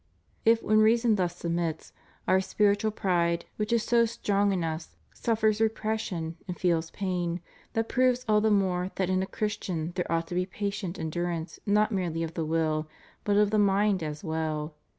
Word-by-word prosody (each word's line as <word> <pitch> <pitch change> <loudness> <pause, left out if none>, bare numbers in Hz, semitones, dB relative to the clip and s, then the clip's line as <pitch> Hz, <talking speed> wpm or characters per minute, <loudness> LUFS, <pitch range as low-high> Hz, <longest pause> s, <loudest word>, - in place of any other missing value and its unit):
If 225 0 +4
when 215 0 +4
reason 230 +1 +4
thus 180 -4 0
submits, 170 -2 -3 0.3
our 190 0 +4
spiritual 205 +2 +2
pride, 170 -5 0
which 210 +1 -2
is 235 -2 +2
so 235 -1 +4
strong 205 -3 +1
in 185 -3 0
us, 160 0 -4 0.2
suffers 220 -2 +1
repression, 215 -7 -1
and 180 - -5
feels 170 -2 +1
pain, 180 -3 -2 0.3
that 225 0 0
proves 255 -1 +2
all 210 -1 +4
the 220 - +3
more 185 -3 +1
that 190 -1 0
in 185 0 +2
a 190 - -2
Christian 185 -7 -3
there 180 -1 -3
ought 165 0 +1
to - - -5
be 180 +1 0
patient 200 -2 -4
endurance 170 +1 -3
not 210 +2 +3
merely 175 -5 -1
of 165 0 -4
the 165 -1 -2
will, 155 -1 0 0.4
but 205 -1 +2
of 210 -1 +4
the 215 - +3
mind 200 -1 +3
as 150 -1 -5
well. 160 -2 -2
190 Hz, 180 wpm, -28 LUFS, 170-215 Hz, 0.4 s, If